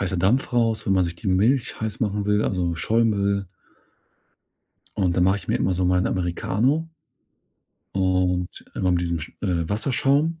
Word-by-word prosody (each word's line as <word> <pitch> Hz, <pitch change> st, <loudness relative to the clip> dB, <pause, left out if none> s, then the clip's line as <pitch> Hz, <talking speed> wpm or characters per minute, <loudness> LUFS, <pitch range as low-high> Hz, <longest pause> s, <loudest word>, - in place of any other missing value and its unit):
heißer 95 Hz, -1 st, -1 dB
Dampf 105 Hz, +10 st, +1 dB
raus, 115 Hz, -2 st, +1 dB
wenn 95 Hz, -, +3 dB
man 95 Hz, -1 st, +3 dB
sich 85 Hz, 0 st, -3 dB
die 100 Hz, -, -4 dB
Milch 115 Hz, +8 st, +1 dB
heiß 110 Hz, -1 st, -4 dB
machen 105 Hz, -2 st, -1 dB
will, 105 Hz, +1 st, +2 dB
also, 90 Hz, -3 st, -1 dB
Schaum 115 Hz, +6 st, +1 dB
will. 100 Hz, -1 st, 0 dB, 1.5 s
Und 90 Hz, -3 st, +1 dB
da 90 Hz, -, +2 dB
mache 95 Hz, +2 st, +3 dB
ich 100 Hz, -, -10 dB
mir -, -, +2 dB
immer 95 Hz, -, 0 dB
so 90 Hz, +1 st, 0 dB
meinen 90 Hz, 0 st, +2 dB
Americano. 105 Hz, -, 0 dB, 1.1 s
Und 90 Hz, -1 st, 0 dB
immer 90 Hz, -, 0 dB
mit 85 Hz, -, +1 dB
diesem 85 Hz, -1 st, -1 dB
sch 80 Hz, -, -7 dB
äh, 85 Hz, -5 st, -1 dB
Wasserschaum 140 Hz, +8 st, +1 dB
95 Hz, 175 wpm, -23 LUFS, 90-110 Hz, 1.5 s, wenn